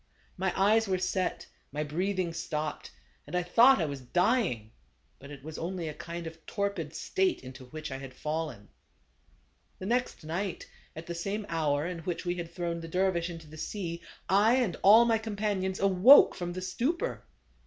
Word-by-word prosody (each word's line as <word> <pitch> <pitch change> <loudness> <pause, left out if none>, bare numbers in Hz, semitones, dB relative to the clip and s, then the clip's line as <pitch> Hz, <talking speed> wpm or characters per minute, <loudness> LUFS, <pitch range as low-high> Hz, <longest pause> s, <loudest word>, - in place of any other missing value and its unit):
My 190 0 0
eyes 215 +3 +4
were 190 -1 +1
set, 185 0 -1 0.3
my 150 +2 -2
breathing 180 +3 -1
stopped, 155 -2 -4 0.4
and 155 - -5
I 180 - +1
thought 235 +8 +6
I 165 - +1
was 140 -3 -5
dying; 175 - +1 0.5
but 140 - -12
it 140 -2 -10
was 155 +1 -7
only 175 0 -3
a 155 - -4
kind 170 +2 -7
of 160 0 -9
torpid 195 -7 -2
state 380 -2 0
into 130 0 -10
which 155 +3 -7
I 135 - -3
had 135 -1 -9
fallen. 150 -9 -4 0.5
" 65 -2 -38
The 185 - -7
next 245 -3 -1
night, 175 +4 -3 0.3
at 160 - -7
the 170 - -5
same 200 +5 -3
hour 150 -3 0
in 175 -1 -4
which 175 +2 -4
we 175 - 0
had 170 -2 -6
thrown 170 -1 -3
the 165 - -7
dervis 180 0 0
into 165 -2 -8
the 155 +1 -12
sea, 170 -1 -4 0.3
I 205 +6 +5
and 240 -10 +1
all 220 +4 +8
my 225 -1 +3
companions 205 -3 -2
awoke 195 +8 +7
from 175 -1 -4
the 185 +1 -5
stupor. 300 - -2
175 Hz, 185 wpm, -30 LUFS, 155-200 Hz, 0.5 s, all